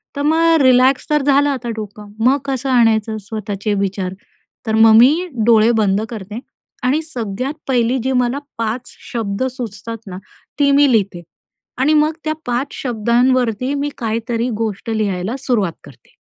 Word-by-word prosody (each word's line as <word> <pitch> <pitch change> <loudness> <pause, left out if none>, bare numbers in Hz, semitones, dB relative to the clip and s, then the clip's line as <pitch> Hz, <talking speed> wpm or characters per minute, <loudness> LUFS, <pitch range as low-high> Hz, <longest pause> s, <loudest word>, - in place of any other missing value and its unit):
तर 285 - -3
मग 325 0 +3
रिलॅक्स 255 +1 +4
तर 300 -1 +2
झालं 285 +1 +3
आता 255 -4 -3
डोकं, 210 -1 -8
मग 270 +3 +5
कसं 270 -1 -2
आणायचं 225 -3 +2
स्वतःचे 205 0 -4
विचार? 190 -1 -2 0.5
तर 220 - +1
मग 220 0 +6
मी 300 +10 +5 0.2
डोळे 225 0 +5
बंद 200 -1 +2
करते 215 -1 -7 0.4
आणि 270 +5 +2
सगळ्यात 255 -2 -4
पहिली 245 -1 +1
जी 265 - 0
मला 245 +3 -1 0.2
5 230 +2 -3 0.2
शब्द 220 -1 -2
सुचतात 230 -2 -6
ना 185 -1 -7 0.4
ती 285 -1 +4
मी 280 -1 +5
लिहिते 195 -6 0 0.5
आणि 275 +5 +2
मग 305 +1 +3
त्या 310 - 0
5 245 +3 -2
शब्दांवरती 245 +1 +1
मी 285 +1 -1
काहीतरी 230 +1 -2
गोष्ट 215 0 -4
लिहायला 205 0 -1
सुरुवात 220 -10 0
करते. 140 -4 -18
235 Hz, 150 wpm, -18 LUFS, 215-265 Hz, 0.5 s, मग